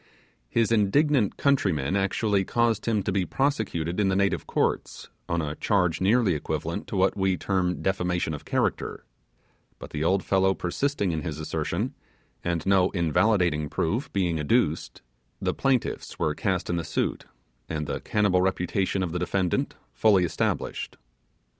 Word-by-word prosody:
His 115 - +1
indignant 115 +2 +3
countrymen 95 - +1
actually 100 +1 +1
caused 115 +2 0
him 110 -3 +1
to 100 - -1
be 95 -1 +1
prosecuted 105 - -1
in 100 -2 +3
the 95 - +1
native 100 0 +1
courts, - - -1 0.2
on 85 -1 0
a 75 -1 -3
charge 90 -1 +1
nearly 105 0 +3
equivalent 75 - -3
to - - -5
what 95 0 +2
we 95 -2 +1
term 90 -5 -1
defamation 90 -3 0
of 75 - -6
character; - - -1 0.7
but - - -10
the 75 0 -2
old 95 +3 +2
fellow 95 0 +2
persisting 100 +2 -1
in 80 -2 -2
his 80 -4 -4
assertion, 80 - -2 0.5
and 85 -2 -1
no 95 -1 +4
invalidating 85 -2 +2
proof 115 - -1
being 85 -5 0
adduced, 75 -2 0 0.4
the - - 0
plaintiffs 135 -3 -1
were - - 0
cast - - -1
in 85 - -1
the 85 - -2
suit, 80 0 -2 0.4
and 80 -1 -2
the - - -3
cannibal 100 -4 +2
reputation 95 +1 0
of 85 - -2
the 90 - -2
defendant 90 0 0 0.2
firmly 95 - +4
established. 85 - -2
95 Hz, 155 wpm, -26 LUFS, 85-105 Hz, 0.7 s, no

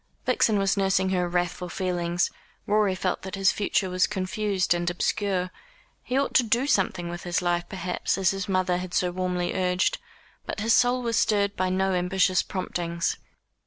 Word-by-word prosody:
Vixen 230 -4 +3
was 195 0 +1
nursing 190 -1 +2
her 180 -2 0
wrathful 175 0 -2
feelings; 175 -1 -1 0.3
Rorie 210 -2 +2
felt 185 0 -2
that 190 0 -6
his 195 0 +3
future 200 -1 0
was 185 0 +2
confused 195 -1 0
and 175 0 -1
obscure. 185 0 -1 0.5
He 255 - -2
ought 280 - 0
to - - +6
do 235 +3 +1
something 190 -8 +1
with 175 0 -6
his 175 0 -1
life, 175 -1 -1
perhaps, 185 -1 -2
as 190 -2 +3
his 195 0 -4
mother 185 -1 +1
had 180 0 -5
so 180 -1 +1
warmly 180 -1 -2
urged. 180 0 +1 0.5
But - - -4
his 225 +2 +3
soul 250 0 +3
was 230 -1 +1
stirred 200 -1 +1
by 185 0 0
no 190 +1 +1
ambitious 185 +1 +2
promptings. 170 -3 -3
185 Hz, 175 wpm, -26 LUFS, 180-200 Hz, 0.5 s, to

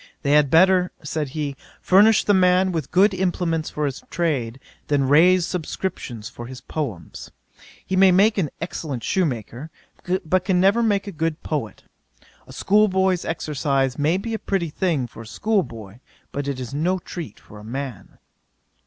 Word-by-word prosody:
"They 140 - +1
had 150 -1 +4
better 180 +3 +4
(said 150 -1 -3
he,) 145 -2 -2 0.2
furnish 210 +4 +5
the 205 - +3
man 185 0 +4
with 160 -6 -3
good 195 +3 +4
implements 175 -3 -1
for 150 - -2
his 135 -1 -4
trade, 135 -8 -1 0.3
than 140 -2 +1
raise 170 +5 +5
subscriptions 160 - -4
for 120 +1 -9
his 130 0 -9
poems. 120 - -6 0.6
He 190 - -2
may 190 0 +6
make 205 +3 +4
an 160 -6 0
excellent 155 -7 -5
shoemaker, 140 - -2 0.6
but 180 +3 +1
can 185 -2 +1
never 200 +5 +4
make 205 -3 +1
a 200 - -6
good 165 -2 -3
poet. 145 -9 -4 0.6
A - - -12
school 210 +2 +3
boy's 190 -2 +1
exercise 140 -4 -1
may 155 +5 +2
be 225 +4 -4
a 220 - -2
pretty 185 -5 -2
thing 160 -7 0
for 115 - -11
a 115 - -11
school 215 - 0
boy; 110 - -10 0.3
but 140 0 -4
it 140 -2 -3
is 125 0 -6
no 170 +6 0
treat 170 - -8
for 105 - -14
a - - -12
man." 125 -1 -7
160 Hz, 170 wpm, -22 LUFS, 135-185 Hz, 0.6 s, may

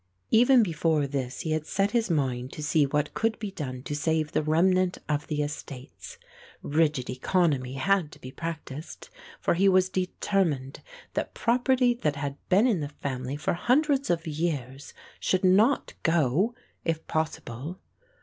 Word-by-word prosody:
Even 245 +1 +6
before 160 -4 +1
this 135 -2 -3
he 160 - -3
had 155 0 -1
set 195 +1 +1
his 230 -2 +1
mind 130 -5 -1
to 150 - -6
see 145 -1 +3
what 150 +1 -1
could 225 0 0
be 210 -3 -5
done 130 -7 -6
to 145 - -4
save 155 +1 0
the - - +1
remnant 180 +4 +2
of 150 -1 -1
the 150 -1 -1
estates. 145 - -8 0.5
Rigid 150 -4 +1
economy 130 -1 0
had 175 +2 +1
to - - -14
be 130 - -9
practised, 160 - -7 0.3
for - - +1
he 195 +3 +4
was 185 0 +4
determined 180 -7 -1 0.3
that - - -3
property 250 +1 +3
that 155 -12 -1
had 140 -1 -3
been 195 +5 +5
in 225 -8 +2
the 145 -2 -3
family 135 -1 -4
for 150 - -1
hundreds 275 - +2
of 170 -1 0
years 145 -4 -3 0.2
should 185 0 0
not 205 +9 +3
go 170 - +2 0.3
if 165 -1 -2
possible. 155 0 -3
160 Hz, 160 wpm, -27 LUFS, 145-190 Hz, 0.5 s, Even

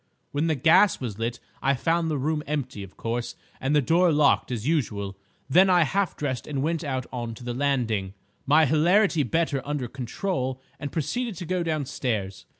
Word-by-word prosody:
When 145 +3 0
the 160 - +2
gas 165 +7 +5
was 115 -5 -5
lit 115 +1 -2 0.2
I 140 +1 +2
found 165 +4 +1
the 150 - 0
room 150 +3 -1
empty, 135 -7 -3
of 95 -1 -11
course, 120 +1 -3 0.2
and 135 +3 0
the 145 - +4
door 170 +5 +4
locked 145 -3 +3
as 120 0 -3
usual. 105 -11 -1 0.3
Then 180 +8 +5
I 175 -2 +5
half 195 +5 -1
dressed 130 -4 -3
and 140 -2 -2
went 165 +1 -1
out 130 -4 -2
on 120 -2 -4
to 125 - -12
the 120 0 -3
landing, 120 -8 0 0.3
my 155 +3 +6
hilarity 170 +4 +3
better 145 +1 0
under 145 -3 -3
control, 130 - -3 0.2
and 145 -2 -5
proceeded 210 - -2
to 175 - -6
go 185 +2 -1
downstairs. 130 - -2
145 Hz, 185 wpm, -26 LUFS, 125-165 Hz, 0.3 s, my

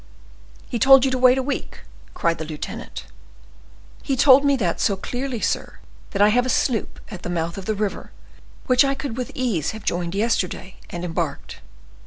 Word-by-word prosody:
"He 240 - -3
told 270 +3 +7
you 265 - +1
to 255 - -1
wait 255 0 +6
a 265 - 0
week!" 275 0 -4 0.3
cried 165 -1 0
the - - -3
lieutenant. 155 -1 -7 1.0
"He 275 - -1
told 275 +1 +7
me 280 -1 +3
that 190 -10 -1
so 200 - +2
clearly, 245 +4 -4
sir, - - -2 0.3
that 200 0 +2
I 210 - +6
have 245 +3 +3
a - - -3
sloop 240 -2 0
at 185 -4 -8
the - - -5
mouth 170 -1 -2
of 195 - -7
the 215 - -1
river, 205 -1 -3 0.5
which 255 +2 +5
I 275 0 +1
could 270 -4 -5
with 250 -1 -4
ease 220 - -1
have 220 - -12
joined 175 +1 -2
yesterday, 200 -3 -1
and 175 0 -5
embarked. 165 -4 -4
220 Hz, 190 wpm, -22 LUFS, 180-255 Hz, 1.0 s, told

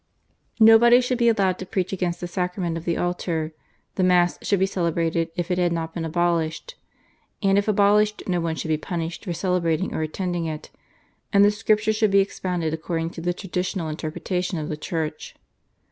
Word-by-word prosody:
Nobody 225 +2 +7
should 250 0 -1
be 235 -1 +5
allowed 195 -5 +1
to 185 - -5
preach 185 0 -2
against 175 -2 -2
the 175 - -3
Sacrament 180 -1 -2
of 165 0 -6
the 170 - 0
Altar; 170 -3 -2 0.4
the 185 - +2
Mass 180 -1 +3
should 200 - +1
be 190 - +3
celebrated 170 -3 -1
if 175 +1 -3
it 180 - +1
had 175 -1 +2
not 165 -1 -3
been 165 -2 -3
abolished, 170 - -1 0.7
and 195 0 +4
if 200 +1 +2
abolished 210 +1 +3
no 180 -2 0
one 165 -1 -1
should 160 - -5
be 155 - +2
punished 165 +3 -5
for 175 - -2
celebrating 180 -1 0
or - - -2
attending 175 +2 -2
it, 155 -1 -6 0.6
and 200 0 +6
the 205 - +5
Scripture 215 +1 +1
should 215 0 +2
be 195 - +3
expounded 180 -4 0
according 165 0 -3
to 165 - -8
the 175 +1 0
traditional 180 -2 -3
interpretation 175 +4 -3
of 155 -1 -4
the 155 - -2
Church. 155 0 -4
175 Hz, 190 wpm, -24 LUFS, 165-195 Hz, 0.7 s, Nobody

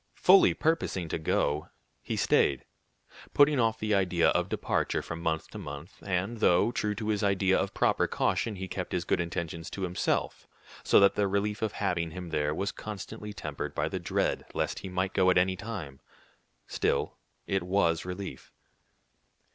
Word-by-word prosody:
Fully 190 +2 +6
purposing 155 - 0
to - - -2
go, 75 -1 0 0.3
he - - -3
stayed, 70 - +2 0.7
putting 145 -1 +5
off 115 -1 +2
the 110 -1 -1
idea 90 -3 +3
of - - +1
departure - - -1
from 85 0 -6
month 80 -1 -1
to - - -7
month; 70 +4 -9
and 100 +4 -2
though, 95 +4 +4
true 105 -3 -1
to 110 0 -4
his 105 -1 0
idea 95 -2 +2
of - - -1
proper - - +2
caution, 110 - 0
he 95 0 -5
kept 90 0 -5
his 90 -1 -1
good - - +1
intentions 85 -1 -4
to 95 - -5
himself, 90 0 -1 0.4
so - - +5
that 100 0 +6
the 100 -1 +1
relief 100 +1 -1
of 110 -2 -1
having 85 -4 -1
him 90 +1 -7
there 75 -2 0
was 100 +2 -1
constantly 105 0 -7
tempered 75 -8 -5
by - - 0
the - - -3
dread - - -1
lest - - -1
he 95 - -7
might 95 +1 -1
go 95 -1 +4
at 90 - +4
any 95 +1 +3
time, 95 -10 -7 0.7
still - - -1 0.3
it 95 -1 0
was 85 -2 +1
relief. 90 +1 -7
95 Hz, 175 wpm, -29 LUFS, 85-105 Hz, 0.7 s, Fully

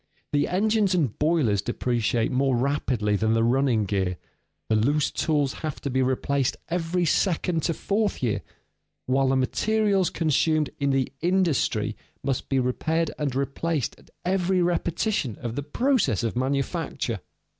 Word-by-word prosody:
The 145 - +2
engines 205 0 +2
and 145 - 0
boilers 150 - +2
depreciate 120 0 0
more 135 0 +2
rapidly 125 -5 0
than 110 +2 +1
the 115 0 +2
running 120 -2 +2
gear; 95 -2 -1 0.5
the 110 - +2
loose 140 +7 +2
tools 145 -4 0
have 155 -3 -4
to 140 - -3
be 130 +1 +1
replaced 130 +1 0
every 175 +1 0
second 170 0 +1
to 165 +1 0
fourth 205 -6 -1
year; 115 -4 0 0.6
while 135 +1 +2
the 135 - +2
materials 200 +8 +1
consumed 155 -1 +1
in 140 -1 +1
the 135 -2 +1
industry 175 -4 +1 0.3
must 135 -2 -2
be 135 - +1
repaired 160 +6 0
and 140 -4 -1
replaced 140 +1 -1
at - - -21 0.2
every 185 0 +1
repetition 170 - 0
of 120 -2 -4
the 145 - -2
process 150 - +1
of 115 - -1
manufacture. 135 +1 -1
140 Hz, 145 wpm, -25 LUFS, 125-170 Hz, 0.6 s, The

